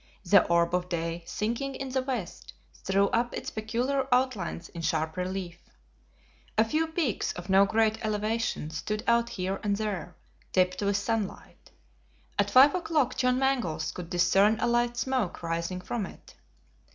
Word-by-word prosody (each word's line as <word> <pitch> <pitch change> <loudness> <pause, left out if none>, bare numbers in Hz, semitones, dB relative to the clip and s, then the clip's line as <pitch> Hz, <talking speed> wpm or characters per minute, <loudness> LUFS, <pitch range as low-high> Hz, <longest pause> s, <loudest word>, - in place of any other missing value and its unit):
The 195 +2 +6
orb 170 0 +2
of 180 0 0
day 170 0 -2
sinking 240 +6 -2
in 270 0 -5
the 260 0 0
west, 250 -9 -5 0.2
threw 195 +1 +1
up 240 +1 0
its - - -5
peculiar 245 +5 -1
outlines 245 -9 0
in 170 - -7
sharp 160 -1 -1
relief. 180 -1 -4 1.0
A 220 - +5
few 310 +8 0
peaks 320 - -1
of 180 +2 -6
no 195 +1 +6
great 220 +1 +1
elevation 215 -6 -1
stood 210 +7 -3
out 235 0 +3
here 190 -1 -3
and 205 -1 0
there, 200 -5 -4 0.4
tipped 185 0 +2
with 200 0 +1
sunlight. 215 0 -4 0.7
At 205 0 +3
five 265 +6 +7
o'clock 320 -7 0
John 250 0 +2
Mangles 205 - 0
could 170 0 -8
discern 195 +5 +3
a - - +1
light 240 0 +1
smoke 255 -10 -1
rising 170 +2 -2
from 205 +1 -3
it. - - -15
210 Hz, 155 wpm, -28 LUFS, 180-240 Hz, 1.0 s, five